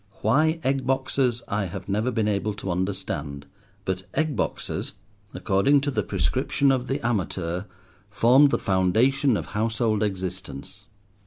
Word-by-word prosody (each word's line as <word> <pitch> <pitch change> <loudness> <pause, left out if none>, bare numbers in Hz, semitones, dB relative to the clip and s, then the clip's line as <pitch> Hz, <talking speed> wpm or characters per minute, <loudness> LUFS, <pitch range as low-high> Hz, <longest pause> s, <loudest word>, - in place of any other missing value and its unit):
Why 155 +9 +3
egg 135 -1 0
boxes 130 -2 0
I 100 0 -1
have 90 - -7
never 105 +5 0
been 110 -3 0
able 105 0 -1
to 95 -2 -4
understand, 85 -6 -3 0.4
but 95 0 -1
egg 155 -3 +1
boxes, - - -3 0.4
according 135 +9 +2
to 145 0 -1
the - - 0
prescription 130 - +1
of 130 -1 0
The 135 -2 -2
Amateur, 95 -5 -1 0.4
formed 125 +7 +5
the - - +1
foundation 110 +7 +2
of - - -4
household 110 0 0
existence. 95 -1 -4
110 Hz, 140 wpm, -25 LUFS, 95-130 Hz, 0.4 s, formed